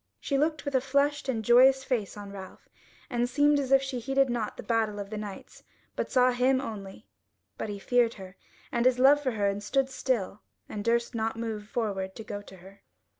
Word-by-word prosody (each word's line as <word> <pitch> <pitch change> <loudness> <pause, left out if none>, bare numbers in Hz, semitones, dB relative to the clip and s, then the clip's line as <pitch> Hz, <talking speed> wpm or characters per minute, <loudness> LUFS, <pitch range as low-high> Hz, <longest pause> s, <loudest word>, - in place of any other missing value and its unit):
She 280 - -2
looked 305 +1 0
with 285 - -3
a 260 - +3
flushed 280 +1 0
and 225 -4 -2
joyous 260 +3 +6
face 225 -7 -2
on 205 -1 -8
Ralph, 190 -1 -11 0.4
and 240 0 -1
seemed 290 +2 +3
as 270 -2 -3
if 270 0 +5
she 265 -2 -3
heeded 270 +1 +1
nought 230 -3 -3
the - - -7
battle 220 -1 0
of 200 0 -6
the 215 - -4
knights, 205 -2 -9 0.3
but - - -3
saw 255 0 +4
him 255 +2 +2
only: 200 -7 -7 0.5
but - - -5
he 205 - -4
feared 235 +3 +2
her, 190 -2 -11 0.4
and 235 +1 +2
his 255 -1 +3
love 275 +3 +6
for 260 -4 -1
her 205 -2 -1
and 200 0 0
stood 270 +5 0
still, 230 -6 -2 0.3
and 205 - -5
durst 235 +2 +1
not 225 -1 -2
move 220 -2 -4
forward 195 -5 -3
to 220 - -8
go 205 -1 -6
to 190 -2 -14
her. 190 +3 -16
235 Hz, 215 wpm, -28 LUFS, 205-265 Hz, 0.5 s, joyous